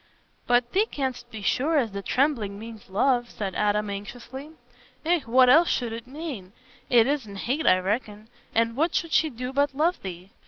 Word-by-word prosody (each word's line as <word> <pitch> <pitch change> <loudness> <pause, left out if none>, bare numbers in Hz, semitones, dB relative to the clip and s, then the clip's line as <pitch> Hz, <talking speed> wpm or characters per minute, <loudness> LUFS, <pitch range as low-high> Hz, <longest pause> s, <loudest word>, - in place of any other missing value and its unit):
"But 245 0 +2
thee 410 +4 +2
canstna 260 - -4
be 220 -3 -8
sure 300 +9 +1
as 235 -6 +1
the 200 0 -5
trembling 235 -5 0
means 220 -1 -10
love?" 240 +4 +1
said 195 -3 -4
Adam 210 +1 +1
anxiously. 240 +7 -8 0.6
"Eh, 345 +1 +3
what 255 +2 +6
else 320 +7 +6
should 235 -3 -1
it 230 +1 -7
mane? 265 - -7 0.4
It 235 -2 +6
isna 255 -8 -2
hate, 265 +10 -1
I 185 - +6
reckon. 210 +2 -3 0.3
An' 230 0 +2
what 320 +6 +1
should 335 - -1
she 320 - +4
do 250 0 -6
but 280 0 +1
love 330 +5 +1
thee? 185 0 -8
245 Hz, 185 wpm, -26 LUFS, 210-280 Hz, 0.6 s, what